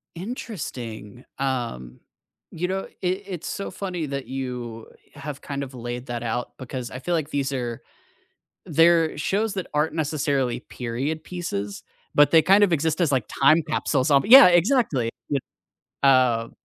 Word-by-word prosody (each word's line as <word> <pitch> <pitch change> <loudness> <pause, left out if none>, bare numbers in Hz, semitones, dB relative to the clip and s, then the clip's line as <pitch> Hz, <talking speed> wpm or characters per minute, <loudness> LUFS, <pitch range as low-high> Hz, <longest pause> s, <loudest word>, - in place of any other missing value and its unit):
Interesting, 130 - -7 0.2
um, 120 - -3 0.5
you 175 +2 -2
know, 190 +1 -2
i - - -10
it's 185 -1 -3
so 200 - -4
funny 180 -5 -4
that 140 -1 -5
you 125 -4 -5 0.3
have 145 0 -7
kind 140 -1 -4
of 135 -1 -9
laid 120 0 -6
that 120 -1 -4
out 120 +1 -3
because 130 -2 -6
I 130 - -6
feel 175 +6 -2
like 155 -3 -2
these 140 -2 -1
are 120 -3 -4 0.8
they're 165 -1 +3
shows 200 +8 0
that 190 - -3
aren't 150 +2 +1
necessarily 140 -5 -1
period 135 +8 -4
pieces, 105 - -5 0.3
but 145 0 +6
they 165 - +7
kind 195 +6 +5
of 190 -4 +3
exist 160 +1 0
as, 165 -4 +2
like, 130 -5 +1 0.2
time 155 +4 +6
capsules 150 -2 0
on 140 -1 +5
Yeah, 260 +3 +10
exactly, 175 - +2 0.2
it 140 -2 0 0.6
Oh. 125 -4 +4
140 Hz, 155 wpm, -24 LUFS, 125-170 Hz, 0.8 s, Yeah